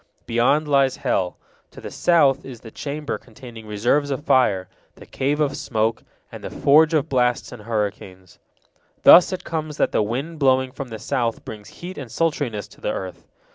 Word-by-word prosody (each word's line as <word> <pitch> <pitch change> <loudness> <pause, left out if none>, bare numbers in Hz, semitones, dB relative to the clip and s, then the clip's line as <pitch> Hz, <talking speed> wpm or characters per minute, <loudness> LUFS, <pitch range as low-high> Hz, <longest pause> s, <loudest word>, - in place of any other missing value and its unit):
Beyond 130 +6 +2
lies 140 -2 +3
hell. 90 -2 -1 0.3
To - - -13
the - - -8
south 145 -6 +3
is 125 -4 -10
the 110 - -11
chamber 150 +3 -5
containing 115 -1 -13
reserves 120 +8 +1
of 140 +2 -4
fire, 105 - +2 0.3
the - - -14
cave 145 +3 -2
of 150 -2 0
smoke, 110 -2 -1 0.3
and - - -10
the - - -5
forge 155 +3 +4
of 150 - +1
blasts 125 -2 0
and 120 - -10
hurricanes. 100 -4 -5 0.6
Thus 175 - +8
it 185 - -4
comes 155 -2 -4
that - - +1
the - - +1
wind 135 +10 -3
blowing 130 -2 +2
from 135 0 -7
the 115 -2 -7
south 115 +2 -2
brings 105 -1 -9 0.2
heat 185 -2 -7
and 130 -5 -8
sultriness 140 -8 -1
to - - -19
the - - -1
earth. 95 -1 -7
130 Hz, 180 wpm, -22 LUFS, 110-145 Hz, 0.6 s, Thus